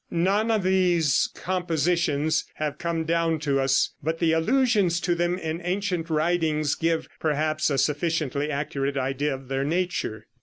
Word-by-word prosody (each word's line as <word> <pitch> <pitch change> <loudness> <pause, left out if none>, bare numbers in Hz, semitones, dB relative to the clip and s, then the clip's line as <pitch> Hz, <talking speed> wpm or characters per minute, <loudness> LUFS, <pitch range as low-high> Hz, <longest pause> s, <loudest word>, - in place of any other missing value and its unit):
None 195 +6 +1
of 220 -3 +1
these 180 -5 +2
compositions 165 -3 0
have 150 -1 -3
come 170 -1 -1
down 165 0 +1
to 140 -3 +1
us, 135 0 +2
but 160 +3 -2
the 165 -1 +2
allusions 205 0 +2
to 175 - +1
them 175 +1 0
in 160 -1 -4
ancient 180 -2 -2
writings 155 -2 +1
give, 165 0 -1
perhaps, 155 0 0
a 140 - 0
sufficiently 150 0 0
accurate 140 -1 -2
idea 135 +2 -1
of 135 0 -12
their 135 +1 -1
nature. 165 - -2
160 Hz, 150 wpm, -25 LUFS, 145-175 Hz, -, these